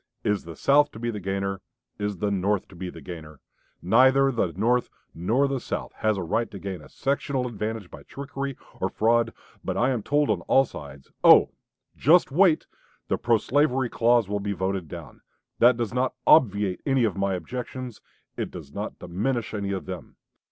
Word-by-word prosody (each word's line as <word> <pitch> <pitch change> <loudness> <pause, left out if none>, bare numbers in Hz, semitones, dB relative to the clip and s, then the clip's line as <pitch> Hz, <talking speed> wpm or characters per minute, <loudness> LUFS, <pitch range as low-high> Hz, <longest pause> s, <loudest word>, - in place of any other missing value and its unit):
Is 105 -4 0
the 85 -1 -8
South 145 +1 +4
to 110 - -9
be 120 0 -2
the 105 - -5
gainer? 95 0 -3 0.4
Is 105 -1 -2
the 100 +3 -1
North 100 0 0
to - - -14
be 90 +1 -5
the - - -11
gainer? 80 -5 -9 0.4
Neither 130 +8 +5
the 105 -8 0
North 120 +8 +1 0.2
nor 115 +12 +1
the 135 -1 -2
South - - -5
has 110 -1 +1
the 95 - -3
right 115 +8 -1
to 100 - -9
gain 95 -3 -6
a - - -14
sectional 135 -1 -1
advantage 110 -4 -4
by - - -10
trickery 140 -1 -6 0.2
or - - 0
fraud.... 115 +1 +2 0.3
But - - -2
I 125 +3 +2
am 120 -4 -1
told 145 +2 +1
on 95 -5 -1
all 135 - +5
sides, 70 - -11
'Oh! - - +8 0.4
just 165 +2 +4
wait; 170 +1 +4 0.4
the - - +1
pro 120 -1 +3
slavery 130 0 +1
clause 120 -2 +3
will 105 0 -2
be 100 0 -2
voted 95 -2 -2
down.' - - -10 0.4
That 120 0 +6
does 115 -3 -2
not 130 +1 0
obviate 100 - +4
any 135 -3 +2
of 110 -4 +1
my 100 -1 0
objections; 125 +4 -6 0.3
it - - -3
does - - -10
not - - -5
diminish 115 +6 -2
any 100 -2 -2
of 95 -2 -3
them. 90 -2 -8
110 Hz, 190 wpm, -25 LUFS, 95-130 Hz, 0.4 s, Oh